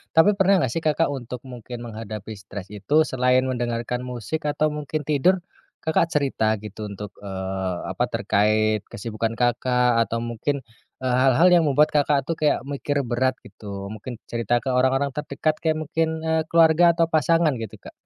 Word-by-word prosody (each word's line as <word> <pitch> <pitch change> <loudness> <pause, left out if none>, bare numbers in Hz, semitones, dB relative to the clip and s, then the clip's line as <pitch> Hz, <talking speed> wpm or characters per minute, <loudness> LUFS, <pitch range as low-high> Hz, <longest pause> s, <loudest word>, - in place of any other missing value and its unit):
Tapi 160 +5 +7
pernah 195 0 +4
nggak 125 - 0
sih, 165 - -3
Kakak, 155 +1 +2
untuk 125 -2 -6
mungkin 120 0 -8
menghadapi 110 -1 -7
stres 100 -1 -9
itu 105 +8 -2
selain 125 0 +2
mendengarkan 120 0 -2
musik 125 +6 -4
atau 150 +1 +1
mungkin 150 +1 -3
tidur, 155 +5 +3 0.5
Kakak, 160 +1 +2
cerita 130 -7 +1
gitu 105 0 -7
untuk, 100 +1 -7
eee, 95 -2 -3 0.2
apa, - - -1
terkait 110 +1 +2
kesibukan, 115 +1 -3
Kakak, 125 0 +2
atau 115 - -2
mungkin, 125 +4 -2 0.4
eee, 125 -1 +1
hal-hal 135 +7 +5
yang 175 -2 +6
membuat, 145 +2 +4
Kakak, 145 -2 +2
tuh 165 +3 -2
kayak 150 -3 +2
mikir 140 +1 -2
berat 130 +2 0
gitu 100 -1 -8
mungkin 110 +3 -7 0.2
cerita 120 +1 0
ke 135 - -2
orang-orang 130 +2 +2
terdekat 150 +2 -2
kayak 160 -2 0
mungkin, 160 +2 0 0.2
eee, 160 0 +1
keluarga 165 +1 +5
atau 165 -1 +1
pasangan 160 +1 +3
gitu, 110 -3 -6
Kak? - - -11
130 Hz, 165 wpm, -23 LUFS, 110-150 Hz, 0.5 s, Tapi